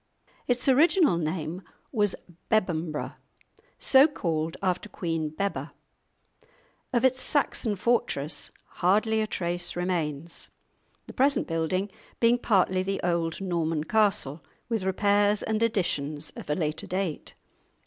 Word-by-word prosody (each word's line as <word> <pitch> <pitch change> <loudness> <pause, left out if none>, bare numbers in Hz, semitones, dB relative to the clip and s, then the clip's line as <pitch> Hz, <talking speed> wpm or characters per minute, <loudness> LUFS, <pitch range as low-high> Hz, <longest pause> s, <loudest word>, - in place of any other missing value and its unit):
Its 245 +1 0
original 305 - +5
name 165 +1 -3 0.3
was 205 -5 +1 0.3
Bebbanburgh, 170 -8 0 0.6
so 270 +2 +6
called 165 - -2
after 185 +2 -1
Queen 165 -4 -2
Bebba; 195 +6 -3 1.2
of 245 0 +2
its 260 0 +2
Saxon 245 -6 +1
fortress 190 -9 -1 0.3
hardly 215 +5 +3
a 215 - -1
trace 175 -2 -1
remains, 170 -3 -3 0.6
the - - -10
present 275 +2 +2
building 165 +4 -1 0.3
being 235 +1 +4
partly 185 -4 +2
the 195 +1 -2
old 170 0 0
Norman 165 -4 -1
castle, 170 -7 +1 0.3
with 225 -3 0
repairs 205 +2 +2
and 220 0 -1
additions 155 -9 -1
of - - -10
a 150 - +2
later 155 -3 -2
date. 185 -4 -3
185 Hz, 120 wpm, -27 LUFS, 165-220 Hz, 1.2 s, so